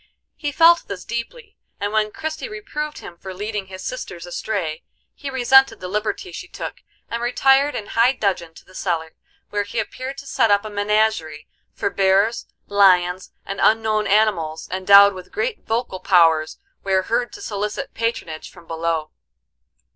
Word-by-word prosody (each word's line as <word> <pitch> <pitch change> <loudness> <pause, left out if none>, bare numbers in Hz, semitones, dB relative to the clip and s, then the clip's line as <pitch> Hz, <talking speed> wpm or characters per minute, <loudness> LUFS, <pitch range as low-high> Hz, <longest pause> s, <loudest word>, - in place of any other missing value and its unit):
He 290 -2 -3
felt 335 +3 +5
this 195 -2 -6
deeply, 415 - -6 0.2
and 205 +1 -2
when 215 -1 +1
Christie 315 - -5
reproved 395 -8 -5
him 170 - -10
for 190 -1 -8
leading 210 0 -4
his 185 0 -9
sisters 180 -9 -6
astray, 175 -3 -3 0.3
he 285 - -7
resented 265 +1 +4
the 185 - -6
liberty 210 - -3
she - - -8
took, - - -7 0.3
and 235 0 -4
retired 270 +4 +3
in 210 - -4
high 235 +4 +3
dudgeon 185 -8 -2
to - - -15
the 185 - -19
cellar, 165 -4 -2 0.4
where 205 - 0
he 205 +3 -6
appeared 255 +5 -4
to 280 - -9
set 240 -4 +2
up 205 +1 +3
a 215 - -6
menagerie,—for 205 -6 -1
bears, 195 +4 +2 0.2
lions, 185 -2 +3
and 195 - -5
unknown 215 -1 +3
animals, 195 -7 +1
endowed 200 +2 +7
with 185 -1 -11
great 445 +1 -3
vocal 225 -4 -2
powers, 165 -4 +3 0.3
were 190 -1 +2
heard 240 +4 -1
to - - -9
solicit 210 +6 -4
patronage 225 -9 -3
from 175 -2 -16
below. 165 -1 -2
205 Hz, 160 wpm, -21 LUFS, 185-245 Hz, 0.4 s, endowed